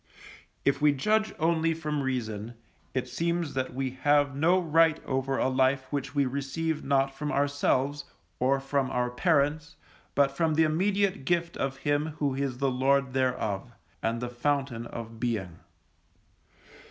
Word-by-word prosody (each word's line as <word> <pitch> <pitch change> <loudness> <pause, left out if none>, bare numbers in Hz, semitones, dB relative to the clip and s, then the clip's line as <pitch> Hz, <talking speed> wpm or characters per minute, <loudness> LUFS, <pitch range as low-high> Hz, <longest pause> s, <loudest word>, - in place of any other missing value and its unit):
If 140 +1 +2
we 150 -1 +5
judge 215 +10 +1
only 165 0 +2
from 150 -2 -2
reason, 120 -4 -3 0.4
it 130 - -1
seems 170 -1 -1
that 130 -1 -2
we 130 -1 -1
have 145 -1 +3
no 170 +6 +3
right 165 -1 +3
over 135 0 -1
a - - +2
life 130 +1 +2
which 140 -1 -3
we 140 -1 +3
receive 140 +4 -2
not 135 0 +2
from 150 +2 -4
ourselves, 145 0 +1 0.3
or 135 +2 +2
from 135 -1 -1
our 125 -1 -1
parents, 150 +1 +1 0.4
but 140 -1 +4
from 155 +2 0
the 160 - +5
immediate 190 +2 +1
gift 170 +2 0
of 135 0 -2
Him 145 +2 -1
who 145 -2 0
is 135 -2 -2
the 135 0 +1
Lord 135 +1 +2
thereof, 125 -5 -1 0.3
and 115 +1 -1
the 120 0 -3
Fountain 125 -2 -1
of 115 -1 -8
Being. 105 -9 -2
140 Hz, 155 wpm, -28 LUFS, 130-155 Hz, 0.4 s, we